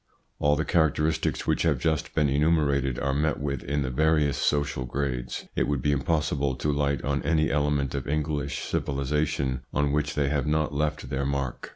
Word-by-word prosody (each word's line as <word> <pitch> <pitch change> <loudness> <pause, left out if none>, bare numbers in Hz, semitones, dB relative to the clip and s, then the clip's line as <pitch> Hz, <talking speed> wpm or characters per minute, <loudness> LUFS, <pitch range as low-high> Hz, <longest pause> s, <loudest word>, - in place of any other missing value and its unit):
All 75 0 +3
the 80 +2 -1
characteristics 80 -1 +1
which - - +1
have - - +2
just 80 -2 -1
been 75 -2 +3
enu 70 +3 +2
merated 70 -5 +1
are 70 -1 0
met 75 +1 0
with 70 -2 -2
in 70 +1 -1
the 65 - -3
various 75 +1 +2
social 70 -3 0
grades; 65 -1 -3
it - - +1
would 70 -3 -1
be 75 - +2
impossible 70 -1 0
to 75 +3 -1
light 70 -1 0
on 70 0 0
any 80 -1 +1
element 70 -2 +1
of 70 -3 -3
English 75 -1 -1
civilisation 70 -1 -1
on 75 -1 +1
which 75 0 0
they 70 -2 +1
have 75 0 0
not 75 -1 +1
left 75 -2 -2
their 70 0 -1
mark. 70 -3 -3
70 Hz, 190 wpm, -26 LUFS, 70-75 Hz, -, All